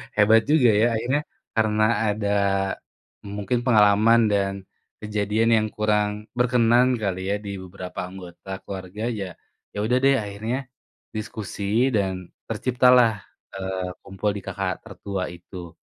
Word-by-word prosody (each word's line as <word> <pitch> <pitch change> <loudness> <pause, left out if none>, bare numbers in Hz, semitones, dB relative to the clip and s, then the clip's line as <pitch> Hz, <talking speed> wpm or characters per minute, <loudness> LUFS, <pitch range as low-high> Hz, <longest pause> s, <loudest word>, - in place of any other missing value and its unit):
Hebat 110 +2 +6
juga 150 -6 +5
ya - - +5
akhirnya 125 +6 0 0.4
karena 110 -1 +2 0.2
ada 105 0 -1 1.1
mungkin 120 +4 -1
pengalaman 110 0 +5
dan 100 -1 +1 0.5
kejadian 105 +2 0
yang 110 0 +1
kurang 105 -1 +2 0.3
berkenan 120 0 +4
kali 95 -3 -1
ya 100 - +1
di - - -5
beberapa 90 0 -8
anggota 90 0 -11
keluarga 95 +1 -7 0.2
ya, 100 - -2 0.5
yaudah 110 +5 +1
deh 140 - +6
akhirnya 110 +5 -3 0.6
diskusi 110 -2 -6 0.3
dan 95 -2 +1 0.4
terciptalah, 125 -1 +4 0.4
eee, 95 -1 -3
kumpul 95 +2 -3
di - - -6
kakak 95 -1 -3
tertua 100 -2 -5
itu. 85 0 -10
105 Hz, 120 wpm, -24 LUFS, 95-115 Hz, 1.1 s, Hebat